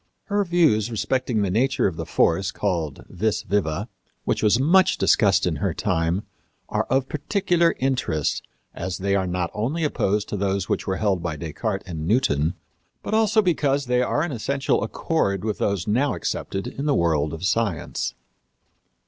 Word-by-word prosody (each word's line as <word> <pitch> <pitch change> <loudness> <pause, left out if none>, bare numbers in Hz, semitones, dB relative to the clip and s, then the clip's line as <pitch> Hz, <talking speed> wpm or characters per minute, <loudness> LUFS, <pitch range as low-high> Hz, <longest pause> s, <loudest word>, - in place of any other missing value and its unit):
Her 205 -1 0
views 160 - +3
respecting 120 -1 0
the 95 - 0
nature 130 +7 +2
of 95 - 0
the - - -5
force 90 +3 +2
called 85 -9 -2
vis 110 +3 -1
viva, 100 0 -1 0.4
which - - 0
was 110 +2 +4
much 180 +7 +4
discussed 95 -3 +3
in 85 -4 0
her - - -1
time, 85 +5 0 0.5
are - - 0
of 135 0 +1
particular 170 +2 +1
interest, 125 - 0 0.3
as 90 +1 -4
they 100 +1 0
are 95 -2 +1
not 90 -1 -2
only 135 +10 -1
opposed 105 -8 0
to 105 - -2
those 100 -1 -1
which - - -2
were 95 -1 0
held 100 -4 +1
by 85 -2 -3
Descartes 95 +6 -3
and 80 -3 -4
Newton, 85 - +2 0.5
but - - -4
also 220 0 +4
because 145 -6 +1
they 125 0 +2
are 145 +4 +1
in 170 - -2
essential 135 +3 0
accord 105 - -1
with 105 -2 -2
those 100 -3 0
now 130 +7 +1
accepted 95 0 -3
in 140 +2 -4
the 145 - +3
world 80 -3 +1
of 80 +3 -5
science. 95 -3 -1
105 Hz, 170 wpm, -23 LUFS, 90-135 Hz, 0.5 s, was